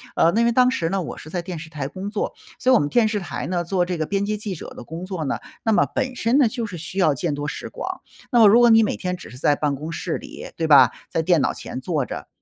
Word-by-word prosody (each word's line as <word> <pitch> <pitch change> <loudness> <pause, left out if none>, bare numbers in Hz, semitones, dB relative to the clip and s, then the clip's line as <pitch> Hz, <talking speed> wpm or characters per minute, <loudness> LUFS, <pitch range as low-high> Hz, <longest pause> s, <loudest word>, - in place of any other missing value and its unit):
呃， 165 - +4
那 225 - +2
因 235 - +3
为 235 - +3
当 250 +1 +4
时 165 -10 -1
呢， 195 0 0
我 160 - -6
是 155 - -10
在 175 +1 -3
电 175 -1 -6
视 165 - -9
台 145 -4 -4
工 190 +5 -6
作。 210 - -3 0.3
所 260 - +3
以 - - +7
我 - - +5
们 145 - -1
电 230 +3 +3
视 210 -1 -1
台 190 - -5
呢， 175 -1 -1
做 180 +1 0
这 180 -1 -3
个 155 - -1
编 200 +4 -1
辑 210 +1 -1
记 205 -2 -5
者 - - -8
的 - - -9
工 165 +3 -7
作 185 -4 -4
呢， - - -1 0.3
那 225 - +2
么 - - +4
本 260 -2 -1
身 235 +4 +2
呢， 275 - +5
就 230 0 -3
是 185 -5 -7
需 170 +4 -8
要 160 -6 +4
见 150 +3 -2
多 145 0 -4
识 - - -5
广。 - - -6 0.3
那 240 - +4
么 220 - +8
如 225 +4 +7
果 240 - +6
你 225 0 +7
每 215 - -1
天 180 -1 -2
只 180 - -11
是 125 - -11
在 145 +2 +2
办 145 -1 -1
公 155 +4 -6
室 165 0 -3
里， - - -9
对 160 -1 0
吧， 145 -3 +7 0.2
在 165 - 0
电 170 0 +3
脑 - - +1
前 - - -7
坐 150 -2 -1
着， - - -7
180 Hz, 335 characters per minute, -22 LUFS, 160-220 Hz, 0.3 s, 么